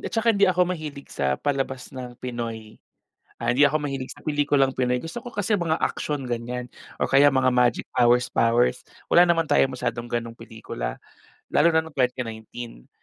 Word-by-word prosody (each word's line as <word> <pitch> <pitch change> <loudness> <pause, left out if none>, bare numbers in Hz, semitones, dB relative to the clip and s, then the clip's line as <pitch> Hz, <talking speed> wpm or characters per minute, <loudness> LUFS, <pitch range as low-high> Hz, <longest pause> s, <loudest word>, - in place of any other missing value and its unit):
ed - - -4
at - - -22
saka 230 0 +3
hindi 200 -2 +4
ako 180 0 +3
mahilig 150 -4 -8
sa 65 -1 0
palabas 135 -2 -3
ng 125 -2 -8
Pinoy. 115 -3 -6 0.6
Ah, - - -3
hindi 145 - +6
ako 150 +2 +2
mahilig 135 -3 -4
sa 145 - -15
pelikulang 145 -3 +1
Pinoy. 125 -1 +1
Gusto 165 - -7
ko 245 - -8
kasi 205 +1 0
mga 165 -4 -1
aksiyon, 145 -4 -2
ganyan, 120 +1 -4 0.3
o - - +1
kaya 140 +1 +5
mga 130 -1 +3
magic 125 -2 +2
powers-powers. 120 -1 +3 0.2
Wala 175 - +7
naman 165 -2 +1
tayong 135 - +3
masyadong 120 -1 -3
ganong 115 -1 -3
pelikula 110 - -6 0.5
lalo 160 +3 +5
na 160 - +4
nung 160 - -12
2019. 120 - -4
130 Hz, 175 wpm, -24 LUFS, 120-150 Hz, 0.6 s, Wala